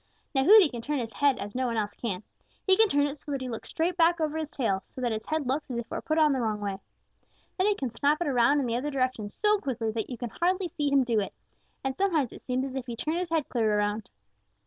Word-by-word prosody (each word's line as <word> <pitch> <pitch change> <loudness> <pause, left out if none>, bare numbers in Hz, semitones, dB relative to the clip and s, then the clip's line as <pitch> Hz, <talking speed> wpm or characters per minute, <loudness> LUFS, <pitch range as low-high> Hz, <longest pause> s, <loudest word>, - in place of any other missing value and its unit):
Now 270 -1 +2
Hooty 415 -2 +9
can 240 -5 -6
turn 295 +5 -2
his 230 -3 -4
head 285 -2 +3
as 205 +1 -6
no 255 0 0
one 230 -1 -2
else 210 -1 -1
can. 205 -5 -4 0.4
He 380 - +6
can 445 +1 +5
turn 285 -2 +3
it 290 +1 -3
so 290 - -9
that 275 -2 -2
he 260 - -3
looks 230 - -6
straight 340 +2 -1
back 340 0 +4
over 310 -1 -1
his 315 -2 -3
tail, 210 -10 -1
so - - -12
that 245 -2 0
his 220 0 -4
head 310 -2 -1
looks 275 +4 -2
as 245 - -3
if 235 - -3
it - - -41
were - - -3
put 310 0 -1
on 305 -2 +5
the 260 - 0
wrong 215 -2 -1
way. 200 -2 -3 0.8
Then 375 - +3
he 415 - +3
can 265 -9 -3
snap 285 +6 +1
it 345 - -1
around 265 +2 +4
in 275 - 0
the 235 -1 -1
other 280 +4 -2
direction 255 -6 -1
so 420 - +2
quickly 235 - -2
that 220 -1 -3
you 250 - -5
can 235 -1 -5
hardly 365 +1 0
see 295 -2 -1
him 275 -1 +5
do 235 -3 +1
it, 200 - -4 0.5
and 265 -1 -1
sometimes 330 - +1
it - - -11
seems 255 +1 -1
as 270 - -6
if 265 -1 -4
he 240 - -4
turned 310 +8 -2
his 360 -1 -3
head 320 -3 0
clear 220 -4 +1
around. 205 0 -1
265 Hz, 285 wpm, -28 LUFS, 230-310 Hz, 0.8 s, Hooty